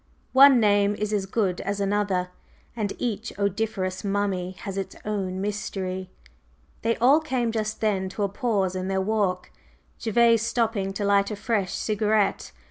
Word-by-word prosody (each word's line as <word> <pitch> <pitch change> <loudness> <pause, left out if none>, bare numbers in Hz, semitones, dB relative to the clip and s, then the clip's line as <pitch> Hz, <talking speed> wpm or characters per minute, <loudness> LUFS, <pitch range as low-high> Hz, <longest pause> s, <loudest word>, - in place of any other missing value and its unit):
One 270 -1 +8
name 205 -1 +3
is 210 0 -3
as 195 -2 0
good 190 -3 0
as 200 +1 -3
another, 200 -2 0 0.5
and 210 -3 -2
each 230 -2 -3
odoriferous 200 -2 -2
mummy 195 -2 -1
has 195 -3 -5
its 195 -1 -4
own 195 -3 -2
mystery." 190 -2 -3 0.7
They 230 +1 +1
all 270 +6 +5
came 255 -7 -1
just 215 -1 -3
then 195 -3 0
to 205 +2 -3
a - - +2
pause 200 -3 -1
in 185 0 -3
their 190 0 0
walk, 190 -2 -1 0.5
Gervase 230 0 +4
stopping 225 -4 0
to 205 +1 -2
light 200 0 +3
a 210 - -3
fresh 205 -3 -1
cigarette. 215 -1 0
205 Hz, 155 wpm, -25 LUFS, 195-220 Hz, 0.7 s, One